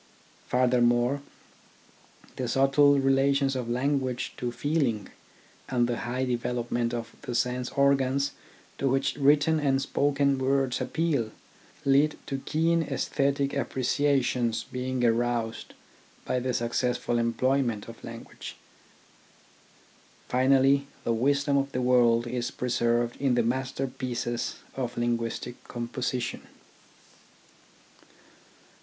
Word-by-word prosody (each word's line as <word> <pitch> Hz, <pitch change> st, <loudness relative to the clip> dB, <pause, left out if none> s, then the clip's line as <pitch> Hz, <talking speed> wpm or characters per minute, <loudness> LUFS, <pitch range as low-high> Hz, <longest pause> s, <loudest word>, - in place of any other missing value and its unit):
Furthermore, 125 Hz, +1 st, +2 dB, 1.1 s
the 130 Hz, -, -3 dB
subtle 140 Hz, +3 st, +4 dB
relations 135 Hz, 0 st, +2 dB
of 125 Hz, -2 st, -3 dB
language 130 Hz, 0 st, -1 dB
to 120 Hz, -1 st, -2 dB
feeling, 125 Hz, -, -1 dB, 0.6 s
and 120 Hz, -2 st, +2 dB
the 120 Hz, -1 st, -1 dB
high 125 Hz, +2 st, -2 dB
development 120 Hz, -1 st, -1 dB
of 115 Hz, -1 st, -5 dB
the 120 Hz, -, -5 dB
sense 125 Hz, +1 st, 0 dB
organs 140 Hz, 0 st, +2 dB, 0.5 s
to 135 Hz, -, +1 dB
which 135 Hz, +1 st, +1 dB
written 145 Hz, +2 st, +4 dB
and 135 Hz, -2 st, +2 dB
spoken 140 Hz, 0 st, +1 dB
words 135 Hz, -1 st, +1 dB
appeal, 140 Hz, -3 st, 0 dB, 0.6 s
lead 140 Hz, +2 st, +3 dB
to 135 Hz, -1 st, -3 dB
keen 165 Hz, +4 st, +1 dB
aesthetic 140 Hz, -3 st, 0 dB
appreciations 130 Hz, -3 st, 0 dB
being 125 Hz, 0 st, -3 dB
aroused 115 Hz, -1 st, -1 dB, 0.5 s
by 125 Hz, -, 0 dB
the 125 Hz, 0 st, -2 dB
successful 120 Hz, 0 st, 0 dB
employment 120 Hz, -1 st, 0 dB
of 115 Hz, 0 st, -11 dB
language. 115 Hz, 0 st, -9 dB, 1.7 s
Finally, 135 Hz, +2 st, +3 dB, 0.2 s
the 115 Hz, -, +1 dB
wisdom 140 Hz, +4 st, +2 dB
of 140 Hz, 0 st, 0 dB
the 125 Hz, -, -1 dB
world 120 Hz, -2 st, +4 dB
is 120 Hz, 0 st, -2 dB
preserved 120 Hz, -1 st, 0 dB
in 135 Hz, -3 st, +2 dB
the 120 Hz, -, +3 dB
masterpieces 130 Hz, -1 st, -2 dB, 0.2 s
of 125 Hz, -3 st, -4 dB
linguistic 120 Hz, +1 st, -2 dB
composition. 120 Hz, 0 st, -4 dB
130 Hz, 105 wpm, -27 LUFS, 120-140 Hz, 1.7 s, subtle